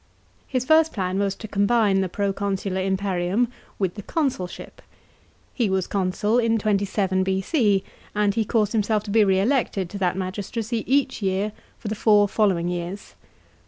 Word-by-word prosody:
His 255 -2 -1
first 320 +2 +4
plan 185 -1 -1
was 200 -1 0
to 220 - -8
combine 205 -1 +2
the 190 - -1
proconsular 195 -1 -2
imperium 190 +3 0 0.3
with 190 -3 -1
the 205 - -7
consulship.! 250 - -3 0.7
He 235 -6 0
was 190 -1 0
consul 205 +4 0
in 230 -1 +2
27 200 -2 0
B.C., 195 - +1 0.3
and 205 -1 +2
he 225 - +1
caused 210 -1 +1
himself 215 -1 +1
to 205 - -6
be 220 0 +5
re 190 -2 +3
elected 205 -5 0
to 200 - -6
that 185 -1 0
magistracy 210 +4 -3
each 275 -3 +2
year 195 +2 0 0.3
for 225 - -8
the 210 - -1
four 210 -1 +4
following 190 -5 +1
years. 175 +2 -5
200 Hz, 160 wpm, -23 LUFS, 190-220 Hz, 0.7 s, be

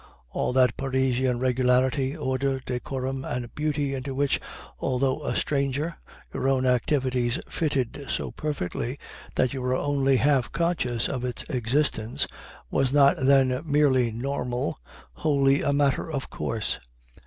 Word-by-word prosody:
All - - -1
that 125 -2 +4
Parisian 130 -2 +1
regularity, 130 +2 +2
order, 135 -1 0
decorum, 130 +1 -3
and 120 -2 -4
beauty 145 -2 -1
into 135 0 -4
which, 140 0 +1 0.4
although 135 +2 0
a - - -1
stranger, 140 +3 0 0.4
your 135 - 0
own 130 -1 +2
activities 125 -1 +1
fitted 140 -2 -2
so - - -2
perfectly 135 -3 -3 0.4
that 130 - +2
you 135 - -4
were 125 0 +1
only 135 -1 +2
half 135 -1 +2
conscious 150 -8 0
of 125 -2 -3
its 125 -1 -2
existence, 125 -2 0 0.5
was 135 -1 +2
not, 140 -1 +6
then, 130 -1 +4
merely 140 -5 +3
normal, 125 - -2 0.3
wholly 140 - +2
a 145 - +1
matter 140 +2 +1
of 140 -3 -4
course. 110 -2 -2
130 Hz, 130 wpm, -26 LUFS, 125-140 Hz, 0.5 s, not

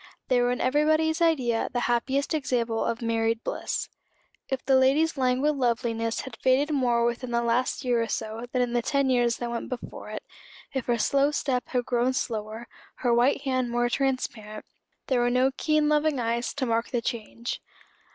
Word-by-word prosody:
They 250 -1 +4
were 245 0 +2
in 250 - -2
everybody's 310 +4 +2
idea 260 -9 +2
the 245 - -1
happiest 265 +5 0
example 245 -6 0
of 235 +1 -2
married 230 0 0
bliss. - - -3 0.6
If 265 -1 -3
the 265 0 +4
lady's 280 +5 +3
languid 265 +3 +1
loveliness 235 -2 0
had 260 -3 -9
faded 270 +4 +2
more 240 -4 +2
within 240 +1 -2
the 235 0 0
last 235 +3 0
year 240 -2 +2
or 230 - -1
so 225 +2 -4
than 250 -1 +2
in 240 -1 -3
the 240 - +2
ten 275 +1 +1
years 240 -2 +2
that 240 -1 -4
went 235 - -4
before 255 - -7
it, - - -6 0.5
if 265 -3 -3
her 240 -1 +2
slow 275 +5 +2
step 265 -4 -1
had 250 -2 -1
grown 245 +1 +1
slower, 220 -2 -3 0.4
her 240 - +4
white 250 +4 +3
hand 255 -3 0
more 240 0 +1
transparent, 240 -5 -2 0.4
there 260 -3 +1
were 240 - +2
no 255 +2 +3
keen 305 -1 +2
loving 300 -2 +2
eyes 235 +1 -1
to 280 -2 -1
mark 230 -1 0
the 240 - -1
change. 235 0 -4
245 Hz, 185 wpm, -26 LUFS, 235-270 Hz, 0.6 s, They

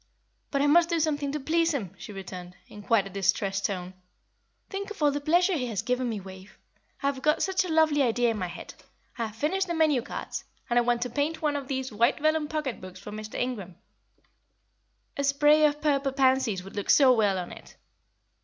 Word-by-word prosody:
"But 280 0 +1
I - - +3
must 335 +3 +5
do 335 -1 +1
something 295 -3 0
to 300 - -3
please 330 +2 +1
him," 200 -10 -4
she - - -10
returned, 180 -2 -8
in 210 - -11
quite 205 -1 +2
a - - -7
distressed 195 +1 0
tone. 185 -2 -5 0.7
"Think 395 +1 -5
of 420 - -9
all 290 - +5
the 290 +1 -3
pleasure 350 +6 +3
he 260 -7 -1
has 215 -3 -3
given 250 +1 0
me, 220 -3 -3
Wave. 190 +1 -12 0.5
I - - -1
have 280 -1 0
got 305 +3 +2
such 380 -1 +1
a - - -5
lovely 315 -2 +3
idea 240 -2 +2
in 220 - -4
my 180 - -2
head. 175 - -9 0.5
I 230 - 0
have 215 - -12
finished 375 +10 0
the 340 - -2
menu 310 -5 +3
cards, - - -6 0.3
and 240 - +5
I - - +4
want 240 0 +1
to 250 - -4
paint 295 +5 -1
one 295 -1 +1
of 280 -2 -4
these 265 -3 -3
white 235 +5 +3
velum 310 0 +1
pocket 300 -5 -3
books 185 0 -10
for 205 +2 -9
Mr. 215 0 -7
Ingram 210 -8 -3 1.4
a 280 - -1
spray 295 +2 +5
of 295 0 -3
purple 280 -2 +1
pansies 260 -8 +2
would 195 - -11
look 205 - -4
so 265 -3 +7
well 205 -5 +2
on 180 -1 -5
it. - - -13
265 Hz, 220 wpm, -27 LUFS, 210-300 Hz, 1.4 s, so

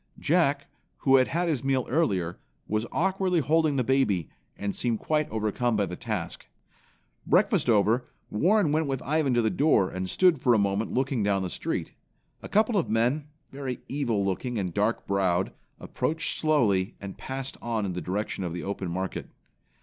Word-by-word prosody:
Jack, 145 -3 +2 0.4
who 135 -1 +7
had 130 - +4
had 175 +1 -1
his 150 -7 -1
meal 135 -2 +1
earlier, 95 - 0 0.3
was 110 +2 -1
awkwardly 190 0 +1
holding 155 +1 +2
the 130 - +1
baby, 115 - +1 0.3
and 100 -1 -3
seemed 120 -2 0
quite 155 +5 0
overcome 110 +2 0
by 105 -1 +2
the 90 - -6
task. - - -5 0.8
Breakfast - - +3
over, 115 +3 +3 0.2
Warren 180 - +3
went 155 0 +1
with 135 -1 -2
Ivan 150 -4 +1
to 120 - +3
the 110 - +2
door, 130 - +3
and 95 0 -4
stood 175 - +3
for 120 -2 +4
a - - +4
moment 100 +1 0
looking 130 -2 0
down 100 -1 +1
the 90 - -4
street. - - -3 0.5
A - - -8
couple 215 0 +3
of 170 - -2
men, 125 +7 +1 0.2
very 135 -3 -5
evil 120 -8 -1
looking 115 +6 -2
and 90 -4 -2
dark 105 +3 0
browed, 95 -2 +1 0.3
approached 160 +1 -2
slowly, 115 -10 +2
and 100 -1 -7
passed 135 0 -5
on 115 -3 -1
in 95 - -3
the 90 - -4
direction 95 +3 -3
of 85 -2 -3
the 90 - -5
open 100 -2 -3
market. 95 +2 -4
120 Hz, 180 wpm, -27 LUFS, 100-145 Hz, 0.8 s, who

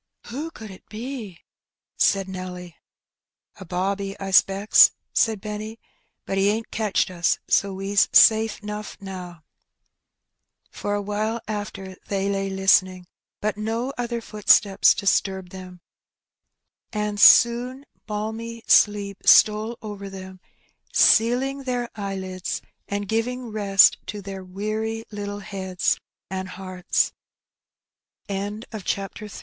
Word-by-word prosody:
'' - - -21
Who 295 +7 -4
could 220 -9 -11
it 185 - -15
be? 220 -5 -7 0.3
'' - - -69 0.2
said 195 -1 +2
Nelly. 180 -2 -7 0.4
" - - -56
A - - -8
bobby, 195 +3 -3
I 195 - -5
^specks,^^ 195 +2 +6 0.2
said 220 -3 +2
Benny; 215 +2 -6 0.2
" 230 - -49
but 195 - -1
he 195 - +3
ain^t 220 +2 -1
catched 210 -4 0
us, 175 -1 +1
so 200 -1 +2
we's 195 +1 +1
safe 220 -1 +5
*nough 210 0 -6
now." 180 -4 -9 1.3
For 205 - -3
awhile 210 +3 -2
after 200 -3 -5
they 195 0 -1
lay 195 0 -1
listening, 185 -1 +2 0.4
but 215 0 -1
no 225 +5 -2
other 235 -1 -3
footsteps 210 -2 +4
disturbed 190 -2 0
them, 185 -2 -10 1.1
and 210 -1 -3
soon 245 +5 +5 0.2
balmy 220 +2 -5
sleep 200 -2 +3
stole 215 +2 +5
over 200 -2 -7
them, 190 -1 -10 0.5
sealing 255 +5 +3
their 250 -2 -2
eyelids, 190 -3 -4 0.3
and 200 0 -3
giving 240 +3 -2
rest 200 -3 +5
to 205 -1 -6
their 195 -1 -7
wea 215 +4 -4
205 Hz, 110 wpm, -23 LUFS, 195-220 Hz, 1.3 s, ^specks,^^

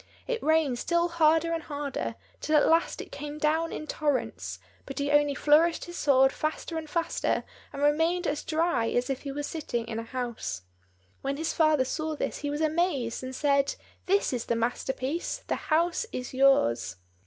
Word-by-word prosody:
It 485 -2 -2
rained 310 -6 +2
still 340 +3 +1
harder 330 0 +3
and 330 - -1
harder, 290 -2 -4 0.2
till 310 - 0
at 290 - +5
last 330 +1 +2
it - - -11
came 295 +1 -6
down 315 +2 +1
in 310 - -5
torrents; 295 -3 -2 0.3
but 275 - -7
he 285 0 0
only 290 -1 +4
flourished 320 +4 +4
his 345 - -9
sword 270 -3 +4
faster 310 +3 -3
and 315 -1 -4
faster, 335 0 0 0.3
and 280 - -4
remained 325 +5 +2
as 295 -1 -1
dry 320 -7 +1
as 250 +2 0
if 265 - -3
he 280 - -5
were 290 +1 -4
sitting 245 -7 -3
in 225 -1 -3
a - - -4
house. 230 - -4 0.6
When 275 +1 -2
his 320 +1 -1
father 310 -5 +3
saw 310 +3 -2
this - - -3
he 290 - -3
was 295 +2 -2
amazed, 310 -7 0
and 260 0 -5
said, 280 -1 +2 0.3
"This 395 -5 +2
is 240 -2 -2
the 235 - 0
master 240 +3 -1
piece, 280 +8 -3
the - - -4
house 340 +7 +2
is 250 0 -5
yours!" 120 - +3
295 Hz, 190 wpm, -28 LUFS, 265-325 Hz, 0.6 s, at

